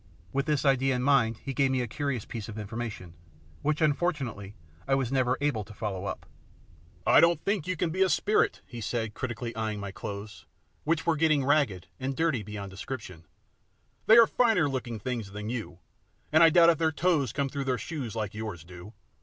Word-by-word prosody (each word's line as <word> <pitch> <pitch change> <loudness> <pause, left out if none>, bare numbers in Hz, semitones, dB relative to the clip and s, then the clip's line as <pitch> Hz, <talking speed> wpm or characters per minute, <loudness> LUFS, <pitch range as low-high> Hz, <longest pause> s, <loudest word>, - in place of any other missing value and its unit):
With 140 +2 0
this 150 -2 +1
idea 135 -1 +3
in 125 - -1
his - - -2
mind 115 -6 +3
he 135 - -3
gave 135 0 +2
me 130 -1 +1
a 120 - -2
curious 140 -1 -3
piece 115 -2 -6
of 110 - -7
information, 105 -4 -6 0.5
which, 150 +2 0
unfortunately, 140 - -1 0.3
I 135 - +3
was 135 -2 -1
never 130 -1 +2
able 145 -7 0
to 100 +1 -13
follow 100 -4 -4
up. - - -5 0.8
"I - - +7
don't 170 -2 +5
think 200 -5 0
you 185 - 0
can 165 0 0
be 185 +3 -2
a 190 - +5
spirit," 215 - +1
he 120 -2 -8
said, 110 -1 -2
critically 120 -1 -4
eyeing 110 -2 -2
my 100 -1 -5
clothes, 100 +2 -8 0.4
which 160 +1 0
were 170 - +3
now 155 - -4
getting 155 -4 +3
ragged 135 - +2
and 135 +1 -3
dirty 160 -7 +1
beyond 100 -1 -7
description. 95 - -7 0.8
"They 220 - +8
are 230 - +9
finer 225 -10 +3
looking 125 -4 -3
things 115 -3 -4
than 105 +1 -5
you, 115 -8 -5 0.5
and 155 +1 +5
I 165 - +9
doubt 170 +1 +7
if 165 - -2
their 160 -1 +2
toes 155 - +1
come 140 -1 -1
through 140 0 -4
their 130 -2 0
shoes 135 - -5
like 105 -3 -3
yours 105 -6 -6
do. 90 +4 -12
130 Hz, 205 wpm, -28 LUFS, 105-150 Hz, 0.8 s, are